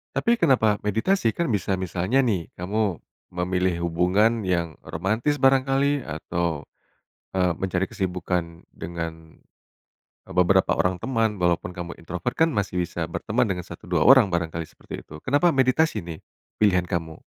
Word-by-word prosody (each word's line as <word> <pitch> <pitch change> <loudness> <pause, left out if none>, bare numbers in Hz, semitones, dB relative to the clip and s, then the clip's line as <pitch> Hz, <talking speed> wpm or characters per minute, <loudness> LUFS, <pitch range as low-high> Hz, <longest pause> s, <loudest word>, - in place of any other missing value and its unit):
Tapi 235 0 +2
kenapa 120 - +3
meditasi? 110 - +1
Kan 170 -1 -1
bisa 100 -3 0
misalnya 95 +7 0
nih, 100 -10 0
kamu 100 0 -2 0.3
memilih 90 -1 0
hubungan 100 +6 +2
yang 85 -4 -1
romantis 110 - -1
barangkali, 135 +1 +3
atau, 80 0 -3 0.6
eee, 90 -2 +1
mencari 95 +1 -1
kesibukan 90 -3 -3
dengan, 80 -1 -7 0.9
eee, - - -8
beberapa 95 +1 +4
orang 90 -1 0
teman 115 -5 0
walaupun 90 0 +1
kamu 85 -1 -7
introvert 90 +7 -4
kan 160 -1 +3
masih 100 -3 -1
bisa - - -4
berteman - - 0
dengan 90 -2 -3
1, - - -11
2 - - +2
orang, 130 -5 +7
barangkali 85 -1 -2
seperti - - -9
itu. 75 - -12
Kenapa 145 +6 +3
meditasi 130 - +2
nih 80 -2 -7 0.4
pilihan 90 -4 +4
kamu? 80 -2 -3
95 Hz, 140 wpm, -24 LUFS, 85-115 Hz, 0.9 s, orang